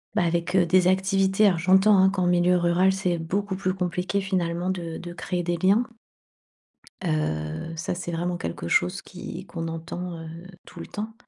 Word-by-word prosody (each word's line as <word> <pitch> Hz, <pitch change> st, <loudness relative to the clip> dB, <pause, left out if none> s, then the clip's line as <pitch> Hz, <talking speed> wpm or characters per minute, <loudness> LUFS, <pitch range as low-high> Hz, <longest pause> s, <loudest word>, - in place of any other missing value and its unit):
bah, -, -, +3 dB
avec, 170 Hz, +2 st, -1 dB
heu, 180 Hz, -2 st, +5 dB
des 180 Hz, +1 st, +4 dB
activités 195 Hz, +2 st, +3 dB
alors, 180 Hz, -5 st, +3 dB
j'entends, 190 Hz, +4 st, +5 dB
hein, 190 Hz, 0 st, +6 dB
qu'en 190 Hz, -2 st, -1 dB
milieu 175 Hz, 0 st, +3 dB
rural, 175 Hz, +2 st, +3 dB
c'est 185 Hz, -3 st, -1 dB
beaucoup 190 Hz, +4 st, -2 dB
plus 185 Hz, -1 st, -1 dB
compliqué 180 Hz, +2 st, -1 dB
finalement 180 Hz, -2 st, -1 dB
de 170 Hz, -3 st, -5 dB
de 175 Hz, 0 st, -8 dB
créer 175 Hz, +1 st, -3 dB
des 175 Hz, 0 st, -1 dB
liens 195 Hz, +7 st, +3 dB, 1.2 s
heu, 80 Hz, -, -2 dB
ça, 170 Hz, -, -3 dB
c'est 175 Hz, -1 st, -5 dB
vraiment 175 Hz, +1 st, -2 dB
quelque 85 Hz, -, -5 dB
chose 180 Hz, -, +1 dB
qui 180 Hz, 0 st, -8 dB
qu'on 165 Hz, -2 st, -5 dB
entend, 170 Hz, +1 st, -6 dB
heu, 165 Hz, -, -8 dB, 0.4 s
tout 175 Hz, -, -12 dB
le -, -, -8 dB
temps. 215 Hz, +2 st, -6 dB
180 Hz, 180 wpm, -25 LUFS, 170-190 Hz, 1.2 s, hein